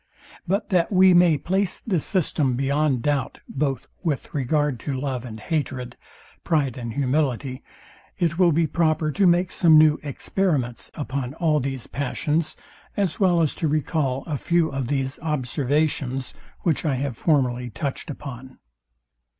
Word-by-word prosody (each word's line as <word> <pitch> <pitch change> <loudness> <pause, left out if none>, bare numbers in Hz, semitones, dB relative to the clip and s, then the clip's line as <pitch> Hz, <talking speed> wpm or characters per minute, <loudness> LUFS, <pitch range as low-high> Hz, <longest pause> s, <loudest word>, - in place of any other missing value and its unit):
But 200 +7 0
that 180 -2 +2
we 185 -1 +6
may 175 -3 +5
place 190 +5 -1
this 185 -9 -1
system 150 -8 0
beyond 135 -1 +1
doubt 145 -3 0
both 135 -2 -2
with 155 -7 -2
regard 145 -1 0
to 135 +2 -3
love 130 -3 -3
and 110 -2 -8
hatred, 130 -3 -3 0.5
pride 145 -7 +1
and 120 -3 -5
humility, 135 -2 0 0.6
it 170 0 0
will 175 -2 +5
be 165 +2 +2
proper 155 0 +1
to 195 +3 +3
make 175 +1 +3
some 160 -3 +5
new 155 -1 +5
experiments 145 -3 -1
upon 135 -2 -4
all 160 -3 +2
these 135 -2 -4
passions, 150 +3 -1 0.4
as 195 -6 0
well 175 -4 +4
as 155 - +1
to 160 - -1
recall 145 -3 0
a 150 -3 -2
few 170 -2 +2
of 135 -2 -3
these 135 0 -2
observations, 140 -2 -1 0.3
which 165 -5 0
I 145 -4 +1
have 135 -1 -2
formerly 125 -4 +1
touched 140 +8 -4
upon. 130 -2 -8
145 Hz, 150 wpm, -24 LUFS, 130-165 Hz, 0.6 s, we